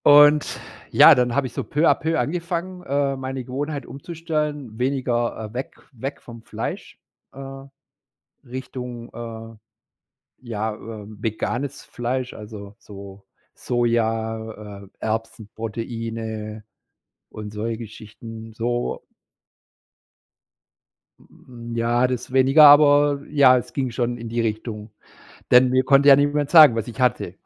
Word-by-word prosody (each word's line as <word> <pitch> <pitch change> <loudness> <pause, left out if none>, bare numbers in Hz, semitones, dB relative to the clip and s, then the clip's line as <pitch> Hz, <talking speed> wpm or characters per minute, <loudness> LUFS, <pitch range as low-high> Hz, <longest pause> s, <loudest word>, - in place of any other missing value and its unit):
Und 145 +1 +6 0.3
ja, - - +8
dann 125 -1 +1
habe 140 -1 +1
ich 125 - -7
so - - -3
peu 150 +3 +1
à - - +6
peu 160 0 -1
angefangen, 175 +2 -3
äh, 140 0 0
meine 130 0 -5
Gewohnheit 140 +4 -4
umzustellen, 150 -5 -4
weniger 125 -2 -1
äh, - - -18
weg 130 +2 -5 0.2
weg 135 +2 -6
vom 115 -1 -12
Fleisch, - - -6 0.3
äh, 135 0 -9 0.8
Richtung, 125 -2 -7
äh, 115 -1 -8 0.9
ja, 110 -2 -3
ähm, 110 -1 -10
veganes 120 +5 -3
Fleisch, 125 +1 -3
also 105 -1 -10
so 100 -1 -12 0.3
Soja, 110 -3 -2
äh, - - -18
Erbsen-Proteine 110 0 -5 0.7
und 105 -1 -8
solche 110 +2 -3
Geschichten. 110 0 -10
So 120 +2 -2 2.2
Hm, 120 -1 -11
ja, 120 +2 +2
das 125 -1 -4
weniger, 135 +4 +6
aber 145 -1 +6
ja, 140 -4 +6
es 125 - -5
ging 130 -3 -2
schon 120 0 -2
in 115 -1 -7
die 115 +1 -1
Richtung, 110 -1 -4 0.6
denn 125 +1 +7
mir 130 +1 +2
konnte 140 +2 +5
ja 135 - +10
niemand 145 0 +1
sagen, 155 -8 +8
was 115 0 -3
ich 120 - -9
hatte. 125 -2 0
120 Hz, 125 wpm, -22 LUFS, 110-135 Hz, 2.2 s, ja